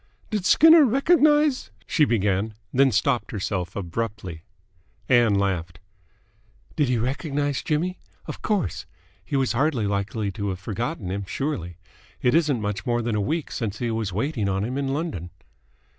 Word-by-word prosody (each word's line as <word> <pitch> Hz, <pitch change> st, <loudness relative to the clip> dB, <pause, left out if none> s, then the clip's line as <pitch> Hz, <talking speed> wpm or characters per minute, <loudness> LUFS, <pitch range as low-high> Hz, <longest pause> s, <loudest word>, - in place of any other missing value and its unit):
"Did 205 Hz, -4 st, -1 dB
Skinner 320 Hz, +1 st, +8 dB
recognise 295 Hz, +2 st, +3 dB
?" 95 Hz, -, -31 dB
she 155 Hz, -, +3 dB
began; 105 Hz, -2 st, 0 dB, 0.2 s
then 135 Hz, +1 st, +4 dB
stopped 120 Hz, +4 st, +1 dB
herself 95 Hz, -4 st, -3 dB
abruptly. 100 Hz, -2 st, -4 dB, 0.7 s
Ann 120 Hz, -4 st, +4 dB
laughed. 90 Hz, -3 st, -1 dB, 1.0 s
"Did 145 Hz, -4 st, +1 dB
he 125 Hz, -, +2 dB
recognise 140 Hz, +3 st, -1 dB
Jimmy? 175 Hz, +4 st, -1 dB, 0.3 s
Of -, -, -7 dB
course! 205 Hz, -, -1 dB, 0.4 s
He 120 Hz, +8 st, -4 dB
was 135 Hz, -2 st, +1 dB
hardly 130 Hz, -3 st, +1 dB
likely 100 Hz, +1 st, -2 dB
to 100 Hz, 0 st, -3 dB
have 95 Hz, -1 st, -4 dB
forgotten 110 Hz, -, -4 dB
him, 100 Hz, +1 st, -3 dB
surely? 90 Hz, -, -3 dB, 0.4 s
It 125 Hz, -, +2 dB
isn't 150 Hz, -6 st, +2 dB
much 105 Hz, -1 st, -3 dB
more 120 Hz, -1 st, 0 dB
than 115 Hz, -1 st, -1 dB
a 105 Hz, -, +1 dB
week 155 Hz, +8 st, -2 dB
since 110 Hz, -4 st, -3 dB
he 120 Hz, -1 st, -2 dB
was 110 Hz, -3 st, -2 dB
waiting 110 Hz, -, -1 dB
on 95 Hz, +1 st, 0 dB
him 125 Hz, +4 st, -3 dB
in 140 Hz, 0 st, -1 dB
London." 135 Hz, -, -3 dB
115 Hz, 160 wpm, -24 LUFS, 100-150 Hz, 1.0 s, Skinner